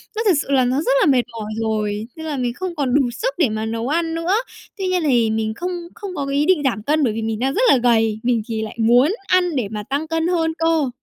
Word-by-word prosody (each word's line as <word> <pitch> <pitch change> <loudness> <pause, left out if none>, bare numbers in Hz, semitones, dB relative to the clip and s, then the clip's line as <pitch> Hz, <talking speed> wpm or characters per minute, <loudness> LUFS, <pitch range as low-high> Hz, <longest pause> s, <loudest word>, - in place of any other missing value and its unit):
nó 445 - -1
thực 390 - +6
sự - - -9
là 260 -2 +4
nó 255 +2 0
rất - - 0
là - - +4
mệt 255 -2 +4
mỏi 215 -2 -6
rồi, 215 -1 -2
nên 320 - -8
là 300 -3 -3
mình 245 -2 -1
không 365 +4 -5
còn 275 -5 -1
đủ 285 - +5
sức - - -2
để 320 -9 +3
mà 215 +1 -3
nấu 230 +2 -3
ăn 325 +2 0
nữa. 335 +4 0 0.4
Tuy 385 -2 -2
nhiên 365 -2 0
thì 240 -5 +3
mình 220 0 -1
không 355 +8 -4 0.2
không 400 -5 -7
có 280 - -2
cái 275 0 -2
ý 295 - +2
định 335 -4 +3
giảm 240 -6 -1
cân 300 +4 +1
bởi 230 - +1
vì 225 - -3
mình 220 -1 -2
đang 265 +2 0
rất 430 - 0
là - - +6
gầy, 225 -3 +2
mình 240 -2 +1
thì 225 -2 -3
lại 220 +1 -6
muốn 245 - +4
ăn 360 -3 +2
để 245 -6 0
mà 210 -1 -4
tăng 285 +4 -1
cân 325 +1 0
hơn 325 -2 +1
cơ. 325 -4 +1
270 Hz, 285 wpm, -20 LUFS, 225-330 Hz, 0.4 s, thực